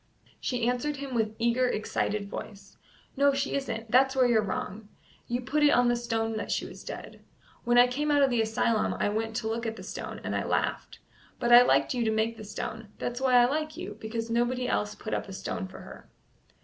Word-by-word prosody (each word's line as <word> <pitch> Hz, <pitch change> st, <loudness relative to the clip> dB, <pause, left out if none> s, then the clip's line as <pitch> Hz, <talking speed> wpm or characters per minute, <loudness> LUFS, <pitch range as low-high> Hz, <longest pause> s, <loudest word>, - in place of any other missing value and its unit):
She 245 Hz, -2 st, -1 dB
answered 250 Hz, +4 st, 0 dB
him 275 Hz, -1 st, -6 dB
with 220 Hz, -2 st, 0 dB
eager, 235 Hz, +2 st, +2 dB
excited 210 Hz, -2 st, -1 dB
voice: 200 Hz, -1 st, -9 dB, 0.4 s
"No, 280 Hz, 0 st, +4 dB
she 275 Hz, 0 st, -1 dB
isn't; 225 Hz, -5 st, -3 dB
that's 265 Hz, +2 st, +4 dB
where 260 Hz, -1 st, +4 dB
you 240 Hz, -2 st, +4 dB
are -, -, +3 dB
wrong. 205 Hz, +1 st, -4 dB, 0.4 s
You 240 Hz, +1 st, -1 dB
put 290 Hz, +5 st, -1 dB
it 295 Hz, -, +6 dB
on 245 Hz, -3 st, +4 dB
the 240 Hz, -, +3 dB
stone 225 Hz, -2 st, -2 dB
that -, -, -4 dB
she -, -, -1 dB
was -, -, -10 dB
dead. -, -, -8 dB, 0.4 s
When 240 Hz, 0 st, +3 dB
I 245 Hz, -, +9 dB
came 280 Hz, +5 st, -2 dB
out 290 Hz, -1 st, +4 dB
of 270 Hz, -, +3 dB
th' 235 Hz, -2 st, +2 dB
asylum 225 Hz, 0 st, +1 dB
I -, -, 0 dB
went 225 Hz, +1 st, -2 dB
to 220 Hz, -1 st, -2 dB
look 230 Hz, +1 st, -2 dB
at 225 Hz, -, -3 dB
the 190 Hz, -, -10 dB
stone, -, -, -6 dB
and -, -, -2 dB
I -, -, 0 dB
laughed. -, -, -2 dB, 0.4 s
But 240 Hz, -1 st, +3 dB
I 240 Hz, -, +11 dB
liked 245 Hz, -, +3 dB
you 245 Hz, -2 st, 0 dB
to 220 Hz, -, +1 dB
make 220 Hz, +1 st, 0 dB
the 215 Hz, -, -10 dB
stone; 215 Hz, +1 st, -6 dB
that's 245 Hz, +1 st, -4 dB
why 260 Hz, -1 st, +3 dB
I 245 Hz, 0 st, +7 dB
like 305 Hz, +4 st, -2 dB
you, 360 Hz, +2 st, -6 dB
because 225 Hz, +1 st, -4 dB
nobody 245 Hz, +2 st, +1 dB
else 105 Hz, 0 st, -1 dB
put -, -, -6 dB
up -, -, -2 dB
a -, -, -7 dB
stone -, -, -4 dB
for -, -, -11 dB
her." -, -, -12 dB
240 Hz, 230 wpm, -28 LUFS, 220-255 Hz, 0.4 s, I